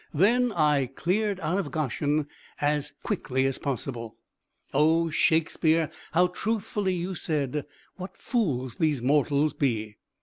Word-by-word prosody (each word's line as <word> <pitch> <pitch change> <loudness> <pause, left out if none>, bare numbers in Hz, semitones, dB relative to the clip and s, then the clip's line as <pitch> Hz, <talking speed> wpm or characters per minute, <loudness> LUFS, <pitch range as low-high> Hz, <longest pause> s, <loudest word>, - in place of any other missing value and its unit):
Then 235 +9 +4
I 150 -5 +3
cleared 190 - -1
out 165 +5 0
of 195 - -3
Goshen 150 0 0 0.3
as 145 0 0
quickly 135 - -1
as 135 -1 -1
possible. 120 -4 -4 0.6
Oh, 160 +3 +3
Shakespeare, 160 0 +2 0.2
how 175 +2 +5
truthfully 195 0 -1
you 180 +2 -3
said, 150 -4 -2 0.3
"What 185 +1 -8
fools 130 - -1
these 150 -6 +1
mortals 145 +2 +2
be!" 110 -6 -1
155 Hz, 125 wpm, -27 LUFS, 140-180 Hz, 0.6 s, how